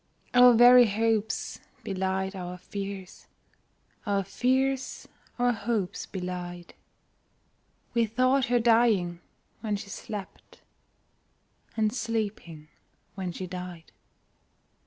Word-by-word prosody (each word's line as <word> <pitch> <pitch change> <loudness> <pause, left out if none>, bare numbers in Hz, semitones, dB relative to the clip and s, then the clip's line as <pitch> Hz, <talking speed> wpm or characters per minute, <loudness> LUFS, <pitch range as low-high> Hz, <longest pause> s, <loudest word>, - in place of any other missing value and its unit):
Our 250 -1 +8
very 245 +1 +8
hopes 220 +1 -1 0.2
belied 190 0 -2
our 180 -1 -6
fears, 195 0 -7 0.8
Our 200 -1 +1
fears 260 +6 -1 0.3
our 245 0 +3
hopes 215 -4 -2
belied 180 -2 -6 1.2
We 235 -1 +2
thought 255 +4 +2
her 245 0 +2
dying 225 -7 +3 0.4
when 215 -2 -2
she 200 0 -7
slept, 205 -2 -8 1.2
And 215 -1 +1
sleeping 210 -10 -4 0.5
when 190 -2 -4
she 185 - -6
died. 180 -2 -8
205 Hz, 95 wpm, -28 LUFS, 185-235 Hz, 1.2 s, Our